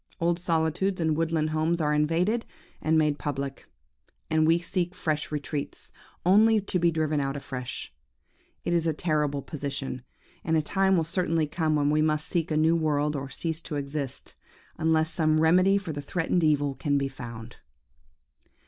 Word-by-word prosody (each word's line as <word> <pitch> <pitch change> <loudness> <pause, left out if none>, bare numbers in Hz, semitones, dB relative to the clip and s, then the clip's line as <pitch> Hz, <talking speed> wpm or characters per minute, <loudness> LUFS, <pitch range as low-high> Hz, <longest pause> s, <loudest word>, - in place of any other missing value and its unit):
Old 170 +1 +1
solitudes 170 +2 0
and 160 -2 +1
woodland 160 -1 0
homes 160 +2 +1
are 150 -2 +1
invaded, 170 +10 +1 0.4
and 160 +1 +2
made 150 -2 +2
public; 140 -2 -4 0.6
and 155 0 +3
we 165 +1 +5
seek 175 +1 -2
fresh 155 -4 -2
retreats, 145 -1 -4 0.3
only 215 +4 +5
to 195 -2 -1
be 170 0 +4
driven 155 -2 0
out 135 0 -2
afresh. 125 -3 -5 0.7
It 175 - 0
is 165 -1 +2
a 160 - +2
terrible 150 -4 0
position, 135 -3 -4 0.4
and 160 -1 +2
a - - +3
time 190 +3 +2
will 165 - +2
certainly 165 -1 0
come 155 0 0
when 145 0 +2
we 155 0 +3
must 155 -1 +1
seek 170 -3 -1
a 155 - 0
new 160 +2 +4
world, 150 -2 +1
or 135 -1 -4
cease 160 +2 -3
to 160 - -6
exist, 140 -1 -5 0.5
unless 160 0 +2
some 155 -1 +2
remedy 185 +5 +5
for 185 -5 -4
the 145 - -4
threatened 170 +3 0
evil 145 -2 +2
can 140 +2 0
be 140 0 0
found. 120 -3 -9
155 Hz, 170 wpm, -27 LUFS, 145-170 Hz, 0.7 s, we